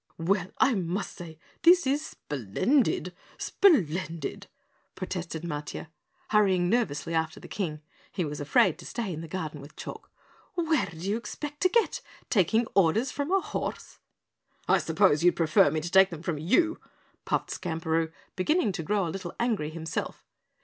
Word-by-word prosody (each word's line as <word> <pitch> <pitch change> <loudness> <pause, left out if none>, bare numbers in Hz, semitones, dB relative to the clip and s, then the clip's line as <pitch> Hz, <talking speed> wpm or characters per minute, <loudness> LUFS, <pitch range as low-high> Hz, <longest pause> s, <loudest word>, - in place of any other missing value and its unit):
"Well, 180 +2 +1
I 270 - +4
must 190 0 -2
say 165 -3 -9 0.2
this 350 0 +6
is 280 +3 +1
splendid, 175 - 0 0.2
splendid!" 180 - +1 0.5
protested 175 -3 -4
Matiah, 150 -1 -5 0.4
hurrying 190 -4 +3
nervously 170 -9 0
after 160 -1 -1
the - - -11
King. 155 -6 -4 0.3
(He 180 - -1
was 150 -1 -5
afraid 145 +3 +3
to 170 - -10
stay 225 -6 -3
in 160 - -5
the 165 - -7
garden 155 -4 -5
with 145 +2 -13
Chalk.) - - -8 0.5
"Where 325 -3 +1
do 165 - -11
you 195 +6 -1
expect 295 +5 -7
to 370 - +5
get, 460 +4 +1 0.3
taking 220 +3 +3
orders 200 +8 +3
from 285 +4 -3
a 390 0 +4
horse?" - - -5 0.7
"I - - +5
suppose 170 -6 +3
you'd 175 - +5
prefer 155 -3 +4
me 155 +2 -1
to 170 +2 -5
take 190 0 +7
them 165 -2 -8
from 165 -3 -2
you!" 325 - +2 0.5
puffed - - -1
Skamperoo, 165 -2 -1 0.2
beginning 215 - +2
to 165 - -4
grow 200 +3 0
a - - -2
little 185 -3 -6
angry 225 -11 0
himself. 160 0 -5
180 Hz, 160 wpm, -28 LUFS, 160-225 Hz, 0.7 s, take